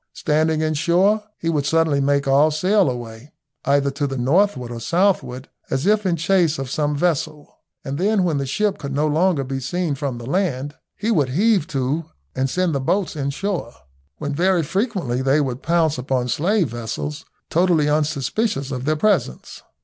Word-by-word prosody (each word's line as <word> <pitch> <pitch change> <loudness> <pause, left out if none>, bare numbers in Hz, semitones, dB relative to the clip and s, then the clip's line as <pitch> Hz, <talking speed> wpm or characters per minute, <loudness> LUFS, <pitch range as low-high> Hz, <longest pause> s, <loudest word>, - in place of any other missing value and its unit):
Standing 155 +1 +1
in 155 0 0
shore, 180 +7 +2
he 165 - -5
would 150 -4 0
suddenly 160 -2 +2
make 140 0 +1
all 140 +3 +5
sail 185 +4 +2
away, 120 +2 -7 0.3
either 140 0 +2
to 140 +1 -2
the 135 -1 -4
northward 135 -1 +1
or 120 - -5
southward, 155 - 0 0.2
as 135 +4 -1
if 210 0 +2
in 175 - +2
chase 170 -1 +2
of 135 -1 -5
some 150 0 0
vessel, 155 -2 -2 0.3
and 140 +1 -4
then 200 +1 +2
when 160 -5 0
the 135 - -3
ship 210 +9 0
could 140 -1 -5
no 150 +2 +1
longer 155 0 +2
be 135 0 -4
seen 170 +4 -2
from 135 -2 -3
the 120 - -8
land 145 -3 -1 0.2
he 220 +2 -1
would 145 - +2
heave 195 - +2
to 140 +3 -2 0.3
and 135 +1 0
send 180 +4 0
the 140 - 0
boats 185 +8 -1
in 140 -2 -2
shore, 170 - -3 0.4
when 145 - -4
very 175 +2 +2
frequently 190 - -1
they 135 +3 +3
would 130 -2 -2
pounce 160 -4 +1
upon 125 -1 -1
slave 170 - +1
vessels 120 +7 -5 0.3
totally 170 -3 +3
unsuspicious 150 - -1
of 130 -1 -4
their 155 +1 +2
presence. 155 - -1
150 Hz, 180 wpm, -21 LUFS, 135-180 Hz, 0.4 s, all